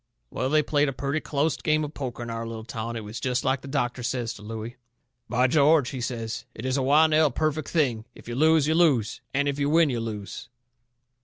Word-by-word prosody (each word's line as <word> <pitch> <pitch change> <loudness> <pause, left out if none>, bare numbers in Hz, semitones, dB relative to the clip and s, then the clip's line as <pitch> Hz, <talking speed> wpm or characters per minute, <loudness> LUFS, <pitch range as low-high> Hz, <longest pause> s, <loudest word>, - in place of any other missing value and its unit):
Well, 130 - -1
they 155 +1 +3
played 145 -1 +2
a - - -4
purty 140 +4 -2
closte 150 +1 -1
game 155 -1 +2
of 150 0 -5
poker 125 -4 -5
in 120 - -5
our 115 0 -4
little 115 -1 -6
town. 115 0 -5
It 115 - -5
was 105 +2 -7
jest 125 0 -1
like 130 0 +1
the - - -10
doctor 130 -3 -1
says 120 -1 -2
to 105 - -13
Looey: 110 +3 -7 0.5
"By 125 +1 +2
George," 145 0 +4
he 130 -3 -5
says, 115 -2 -4
"it 115 - -7
is 130 0 0
a 140 - +1
well 145 +4 +5
nigh 155 -1 +4
perfect 155 +3 -1
thing. 125 -9 0
If - - -15
you 120 - -4
lose 155 +3 +4
you 160 - +2
lose, 150 -10 +2
and 140 +1 0
if 140 0 -1
you 140 0 +1
win 160 -1 +4
you 120 - -1
lose." 105 -2 -6
130 Hz, 235 wpm, -26 LUFS, 115-150 Hz, 0.5 s, well